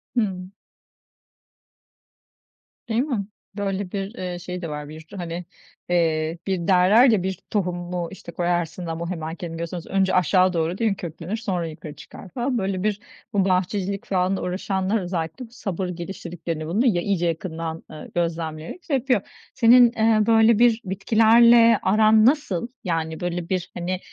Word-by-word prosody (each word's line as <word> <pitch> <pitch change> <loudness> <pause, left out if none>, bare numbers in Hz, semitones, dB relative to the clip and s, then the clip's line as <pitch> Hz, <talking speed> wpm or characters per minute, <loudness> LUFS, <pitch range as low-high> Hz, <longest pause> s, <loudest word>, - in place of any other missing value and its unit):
Hıı. 190 -5 -1 2.4
Değil 225 +2 +2
mi? 245 -9 -2 0.3
Böyle 195 -2 -2
bir, 200 +2 -4
eee, 180 -4 -5
şey 180 0 -6
de 165 - -4
var. 150 0 -6
Bir 155 +1 -9
tü 160 +5 -14
hani, 170 0 -5 0.4
eee, 165 -1 +1
bir 185 -3 -1
derler 195 +7 +6
ya 205 -5 +2
bir 190 - -1 0.2
tohumu 175 -3 -2
işte, 180 -3 -10
koyarsın 175 0 -1
ama 165 +1 -4
hemen 160 -2 -4
kendini 165 -1 -6
göstermez. 170 0 -5
Önce 190 -1 +1
aşağı 185 +1 +3
değil 175 +7 0
mi, - - -1
köklenir, 170 +5 -5
sonra 185 -7 -2
yukarı 155 -1 -9
çıkar 185 - -12
falan. 250 +2 -2
Böyle 190 -2 -2
bir 210 -1 0 0.3
bu 195 -2 +2
bahçecilik 190 +1 -1
falanla 190 0 0
uğraşanlar 190 +3 -1
özellikle, 175 +7 -4
bu 225 - -26
sabır 195 -6 -4
geliştirdiklerini, 170 -2 -5
bunu 210 +10 +1
ya 180 -8 +3
iyice 175 -3 0
yakından, 165 -1 -4
eee, 155 - -10
gözlemleyerek 165 - -3
şey 285 - -1
yapıyor. 250 -5 +1 0.3
Senin, 240 +1 +6
eee, 220 -2 +3
böyle 225 0 +5
bir 235 -1 +4
bitkilerle 230 +4 +5
aran 215 +2 +5
nasıl? 240 - +1 0.2
Yani 160 -3 -2
böyle 175 -1 -3
bir 185 -1 -2
hani, 180 +1 -3
185 Hz, 155 wpm, -23 LUFS, 170-215 Hz, 2.4 s, derler